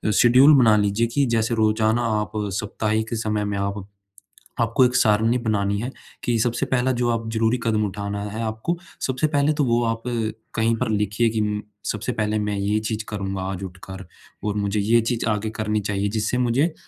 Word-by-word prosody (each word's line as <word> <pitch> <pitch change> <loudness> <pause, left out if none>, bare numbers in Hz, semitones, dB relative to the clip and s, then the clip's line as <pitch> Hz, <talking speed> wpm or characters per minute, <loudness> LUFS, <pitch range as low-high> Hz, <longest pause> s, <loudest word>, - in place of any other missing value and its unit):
schedule 130 +5 +7
बना 115 -5 +6
लीजिए 105 +3 +1
कि 140 +4 +1
जैसे 115 +1 +1
रोज़ाना 110 +1 +2 0.2
आप 105 - -5
साप्ताहिक 105 +2 -2
समय 105 -1 -1
में 100 -1 -2
आप 100 0 -3 0.8
आपको 115 +3 +3
एक 125 0 0
सारणी 110 +2 +3
बनानी 100 -3 0
है, 125 +3 -4 0.3
कि 120 -1 +1
सबसे 120 +1 0
पहला 130 0 +1
जो 120 - +1
आप 115 -1 -2
ज़रूरी 115 +2 +2
कदम 110 -2 +1
उठाना 100 +1 -4
है 110 +2 -4
आपको, 110 +10 -2 0.2
सबसे 130 +3 0
पहले 145 0 +2
तो 150 - 0
वो 120 -1 +2
आप 115 0 -1 0.5
कहीं 115 0 +2
पर 125 0 -1
लिखिए 105 +2 +1
कि 110 -1 -1
म 105 0 -1 0.2
सबसे 110 +4 -2
पहले 110 -1 -1
मैं 105 -1 -1
ये 100 +2 0
चीज़ 110 0 -3
करूँगा 95 -2 -3
आज 95 0 -5
उठकर 95 +1 -9 0.4
और 105 -1 -1
मुझे 100 0 0
ये 115 +4 +3
चीज़ 115 +1 -1
आगे 110 0 -1
करनी 110 -1 -1
चाहिए 100 0 -1
जिससे 110 +3 -1
मुझे 125 +7 +1
110 Hz, 190 wpm, -23 LUFS, 105-115 Hz, 0.8 s, schedule